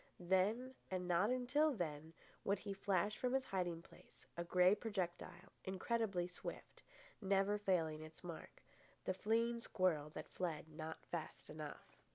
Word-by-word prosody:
Then, 195 +8 +2 0.2
and 185 -1 -1
not 180 +4 +4
until 255 +4 +3
then, 160 -4 -3 0.3
would 200 +1 +2
he 200 - -4
flash 195 +1 +1
from 250 0 +1
his 265 0 +2
hiding 175 -3 -1
place, - - -18
a 170 - -1
grey 180 +2 +6
projectile, 185 -4 -3
incredibly 190 -1 0
swift, 180 - -7 0.4
never 195 +1 +3
failing 165 -6 +2
its 155 0 -10
mark—the 175 +2 -7
fleeing 230 +4 +2
squirrel 185 -10 +1
that - - -6
fled 165 -4 -2
not 155 0 -6
fast 160 -3 -5
enough. 155 -1 -8
185 Hz, 140 wpm, -41 LUFS, 170-210 Hz, 0.4 s, grey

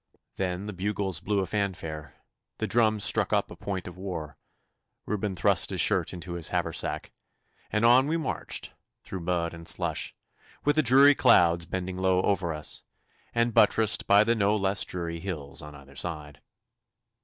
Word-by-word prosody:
Then 95 0 -2
the 105 - -5
bugles 95 -2 -2
blew 105 -1 0
a - - -1
fanfare, 85 -8 -4 0.4
the - - -2
drums 110 -3 +2
struck - - +2
up - - +1
a - - -8
point 95 -3 -5
of 90 0 -9
war, 90 -6 -5 0.7
Reuben 105 -2 -2
thrust 85 - +2
his - - -3
shirt - - +3
into 85 0 -7
his 85 -2 -2
haversack, - - -2 0.6
and 105 +2 +1
on 125 +3 +6
we 160 +2 0
marched 160 - -3 0.3
through 95 - -6
mud 85 -1 -1
and 85 0 -10
slush, - - 0 0.5
with 145 0 +3
the 155 - +4
dreary 135 +2 +7
clouds 85 - +4
bending 95 0 -4
low 95 0 +2
over 95 -4 0
us, 75 -1 -3 0.5
and 115 0 +2
buttressed 105 +1 +3
by 100 +1 +6
the 115 +2 +2
no 105 -2 +2
less 100 -1 +1
dreary 85 -2 -4
hills 80 -5 -6
on 75 -1 -10
either 70 0 -15
side. 75 -2 -4
95 Hz, 165 wpm, -27 LUFS, 85-105 Hz, 0.7 s, dreary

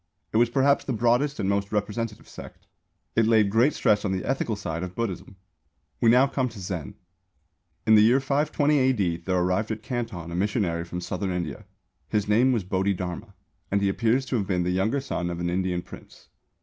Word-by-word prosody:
It - - +2
was 120 +1 +4
perhaps 140 +3 +3
the 130 - -2
broadest 120 +6 +1
and 95 - -1
most 100 0 0
representative 105 +1 -3
sect. - - -12 0.5
It 115 -1 +3
laid 110 -3 +4
great 120 +7 +3
stress 105 -1 +2
on 100 - -1
the 95 -1 -2
ethical 130 -4 -1
side 85 -5 -4
of 90 0 -6
Buddhism. 95 -4 -4 0.6
We 115 - +4
now 125 +3 +6
come 135 -2 -1
to 110 -3 -11
Zen. 90 -7 -5 0.9
In 110 - +5
the 105 - +8
year 120 +5 +5
520 145 +1 +1
A.D. 105 -11 +1
there 95 -1 +1
arrived 90 +4 0
at 110 0 -4
Canton 115 -10 -4
a - - -4
missionary 90 -4 0
from 90 +1 -5
Southern 95 +2 -3
India. 90 -3 -4 0.4
His 105 -1 0
name 120 +5 +4
was 115 -6 0
Bodhidharma 95 +1 -2 0.3
and 100 - +1
he 100 0 +1
appears 115 +6 +1
to 130 - -1
have 100 -3 -2
been 90 -3 0
the 90 - 0
younger 110 +9 0
son 90 -10 -3
of 85 -1 -4
an 85 0 -1
Indian 90 -1 -1
Prince. - - -14
105 Hz, 200 wpm, -25 LUFS, 90-120 Hz, 0.9 s, the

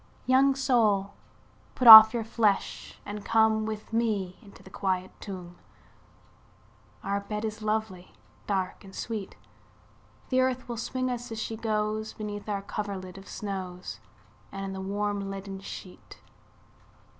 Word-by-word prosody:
II. - - -31 0.3
Young 270 +1 +5
soul 220 -7 +1 0.6
put 250 - +1
off 220 -1 +13
your 235 -1 -2
flesh, 215 -3 -1
and 205 0 -6
come 220 -1 +2
With 215 0 -7
me 210 -6 -1
into 205 -4 -16
the 190 - -15
quiet 185 -1 -2
tomb, 180 -3 -9 1.5
Our 200 +1 -1
bed 210 +2 -5
is 215 0 -5
lovely, 215 -4 -3 0.4
dark, 190 -1 -2
and 190 -1 -13
sweet; 215 -4 -5 0.9
The 260 0 +3
earth 255 0 -1
will 240 -1 -5
swing 255 +3 -2
us, 245 0 -6
as 225 - -5
she 225 - -4
goes, 215 -1 -2
Beneath 210 0 -7
our 200 -1 -2
coverlid 195 -3 -6
of 195 - -15
snows, 185 -3 -6 0.5
And 195 0 -5
the 190 - -6
warm 200 0 -2
leaden 195 0 -7
sheet. 190 -1 -11
210 Hz, 140 wpm, -27 LUFS, 195-220 Hz, 1.5 s, off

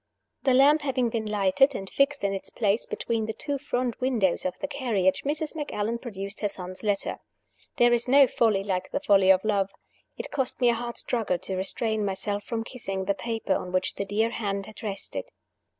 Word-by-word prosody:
The 260 -2 +3
lamp 290 +4 +6
having 255 -4 0
been 225 -1 -2
lighted, 210 +6 +3
and 195 - -5
fixed 280 +4 +1
in 200 0 +1
its 195 - -4
place 210 -1 0
between 225 -2 -2
the 220 - -2
two 285 -2 -3
front 250 -3 -2
windows 225 -10 +1
of 185 - -2
the 285 - -3
carriage, 235 -10 +1
Mrs. 300 +2 -2
Macallan 235 -7 -2
produced 200 -4 -6
her 205 - 0
son's 185 -1 -6
letter. 205 -2 0 0.6
There 240 0 +5
is 240 +1 +1
no 275 +2 +7
folly 220 -5 +2
like 185 -2 -2
the - - -1
folly 200 -8 +4
of 190 +1 +5
love. 200 -3 +1 0.5
It - - -6
cost 265 -3 -1
me 245 -2 +4
a - - +4
hard 235 +1 -4
struggle 225 -7 0
to 190 +2 -4
restrain 215 +3 -1
myself 205 +1 -2
from 225 0 -3
kissing 195 -6 -5
the 200 - +2
paper 225 -1 -2
on 180 - -3
which 185 0 0
the 200 - -3
dear 215 +3 +1
hand 200 -4 -2
had 215 - -12
rested. 195 - -4
220 Hz, 200 wpm, -27 LUFS, 195-250 Hz, 0.6 s, no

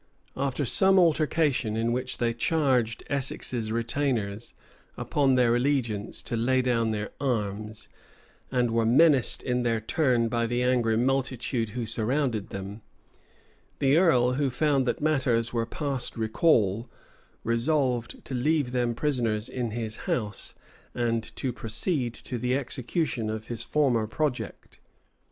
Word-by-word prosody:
After 140 +1 -1
some 190 +9 +5
altercation, 155 -8 +2
in 115 +1 0
which 130 +1 -2
they 115 -1 0
charged 125 -3 +1
Essex's 130 -5 0
retainers, 115 -3 -2 0.4
upon 135 -3 +1
their 120 -2 +3
allegiance, 120 -5 -1
to 120 - -3
lay 130 +3 +2
down, 115 -3 +1
their 105 -1 -3
arms, 105 -4 -3 0.6
and 125 -3 +1
were 115 0 +2
menaced 135 +3 +4
in 125 -1 0
their 115 -2 0
turn 120 0 +1
by 115 0 0
the 120 +1 0
angry 120 -3 +2
multitude 125 -2 0
who 120 - -2
surrounded 115 -1 -1
them, 100 +3 -7 1.0
the 135 +1 +3
earl, 130 -8 +4
who 140 +1 0
found 135 0 +1
that - - -1
matters 130 -7 +1
were 115 -1 -1
past 140 -6 -3
recall, 110 - +2 0.5
resolved 125 0 0
to - - -6
leave 140 +1 +1
them 120 -2 0
prisoners 115 -6 -1
in 125 -2 -3
his 110 -1 -4
house, 105 -5 -3 0.4
and 115 -2 0
to 130 -2 -2
proceed 120 - -2
to 125 +1 -5
the 125 +2 0
execution 130 -2 -2
of 110 0 -5
his 120 -2 -2
former 125 -7 +1
project. 145 +2 -4
120 Hz, 135 wpm, -27 LUFS, 115-135 Hz, 1.0 s, some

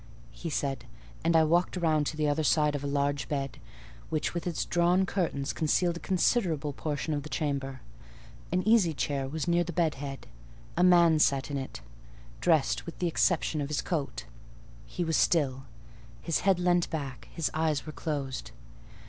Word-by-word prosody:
he 170 - -6
said; 135 -4 -2 0.4
and 165 +1 +2
I 160 - +6
walked 175 +4 +2
round 155 -4 +2
to 155 - -4
the 150 -1 +1
other 145 +2 +1
side 150 0 +3
of 145 -1 -3
a - - -2
large 140 0 -1
bed, 140 -2 -3 0.5
which 155 -2 -1
with 170 0 -3
its 170 - -1
drawn 175 +2 +3
curtains 165 -8 -1
concealed 170 +2 +1
a - - -7
considerable 170 - +1
portion 145 0 -3
of 145 - -1
the 155 - -9
chamber. 140 -5 -2 0.7
An 185 +3 0
easy 205 -8 +4
chair 140 -2 -1
was 155 +4 -4
near 175 0 +3
the 175 - -5
bed 165 -2 +1
head: 135 -1 -6 0.5
a 175 - +2
man 170 -3 +6
sat 140 -1 +2
in 140 - -1
it, 135 - -7 0.6
dressed 160 -3 +2
with 170 - -7
the 180 - 0
exception 165 -2 +1
of 140 - -2
his 150 0 -2
coat; 140 - -3 0.6
he 180 - -3
was 160 -1 +1
still; 135 -5 +2 0.5
his 165 - 0
head 195 -2 +3
leant 175 -1 +2
back; 140 -5 -5
his 165 -5 -1
eyes 155 -2 0
were 155 - -7
closed. 135 - -4
155 Hz, 180 wpm, -29 LUFS, 140-170 Hz, 0.7 s, I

